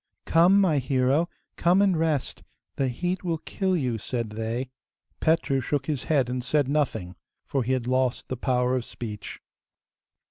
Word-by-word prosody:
'Come, 175 Hz, +4 st, +5 dB
my 170 Hz, -7 st, +3 dB
hero, 135 Hz, +5 st, +1 dB, 0.3 s
come 175 Hz, +2 st, +4 dB
and 200 Hz, -2 st, +4 dB
rest; 155 Hz, -4 st, -1 dB, 0.3 s
the 135 Hz, -, 0 dB
heat 175 Hz, +10 st, -2 dB
will 170 Hz, -2 st, -1 dB
kill 185 Hz, +3 st, -1 dB
you,' 125 Hz, -7 st, -1 dB
said 115 Hz, 0 st, -3 dB
they. 115 Hz, +4 st, -3 dB, 0.5 s
Petru 160 Hz, -4 st, +2 dB
shook 140 Hz, +1 st, -1 dB
his 145 Hz, -4 st, -2 dB
head 140 Hz, -6 st, +2 dB
and 125 Hz, 0 st, -3 dB
said 145 Hz, +1 st, +1 dB
nothing, 135 Hz, -11 st, -1 dB, 0.3 s
for 135 Hz, -, -1 dB
he 130 Hz, +2 st, 0 dB
had 130 Hz, -2 st, -1 dB
lost 130 Hz, 0 st, 0 dB
the 130 Hz, -, -3 dB
power 125 Hz, 0 st, +1 dB
of 125 Hz, -, -1 dB
speech. 105 Hz, -3 st, -7 dB
135 Hz, 165 wpm, -26 LUFS, 125-160 Hz, 0.5 s, Come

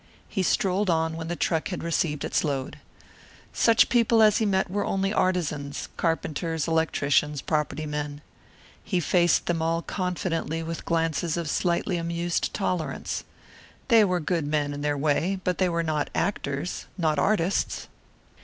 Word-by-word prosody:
He 195 Hz, -, -2 dB
strolled 190 Hz, +2 st, +1 dB
on 160 Hz, -1 st, +1 dB
when 165 Hz, 0 st, -5 dB
the 175 Hz, -, -2 dB
truck 160 Hz, -1 st, 0 dB
had 180 Hz, -, -5 dB
received 165 Hz, -3 st, 0 dB
its -, -, 0 dB
load. 140 Hz, -4 st, -3 dB, 0.7 s
Such 230 Hz, -1 st, +5 dB
people 230 Hz, -2 st, +4 dB
as 210 Hz, -1 st, +5 dB
he 220 Hz, -, +1 dB
had -, -, +1 dB
met 190 Hz, -1 st, +1 dB
were 205 Hz, +1 st, 0 dB
only 195 Hz, +1 st, 0 dB
artisans, 150 Hz, -8 st, -1 dB
carpenters, 165 Hz, -1 st, -1 dB
electricians, 150 Hz, -3 st, +1 dB
property 155 Hz, 0 st, -1 dB
men. 150 Hz, -1 st, -4 dB, 0.6 s
He 185 Hz, -, 0 dB
faced 175 Hz, 0 st, +3 dB
them 170 Hz, -2 st, 0 dB
all 165 Hz, +1 st, 0 dB
confidently, 175 Hz, -3 st, -2 dB
with 165 Hz, 0 st, -5 dB
glances 165 Hz, 0 st, 0 dB
of 170 Hz, -2 st, -2 dB
slightly 175 Hz, +3 st, 0 dB
amused 170 Hz, 0 st, -1 dB
tolerance. 180 Hz, -5 st, -2 dB, 0.6 s
They 230 Hz, -3 st, +7 dB
were 180 Hz, -3 st, +1 dB
good 165 Hz, -2 st, -1 dB
men 145 Hz, -1 st, 0 dB
in 145 Hz, -, -5 dB
their 145 Hz, 0 st, 0 dB
way 155 Hz, +6 st, +1 dB
but 180 Hz, -1 st, -1 dB
they 185 Hz, -1 st, +3 dB
were 170 Hz, 0 st, 0 dB
not 155 Hz, -2 st, -1 dB
actors 140 Hz, -4 st, -2 dB
not 155 Hz, -4 st, +1 dB
artists. 200 Hz, -1 st, 0 dB
165 Hz, 155 wpm, -26 LUFS, 155-185 Hz, 0.7 s, They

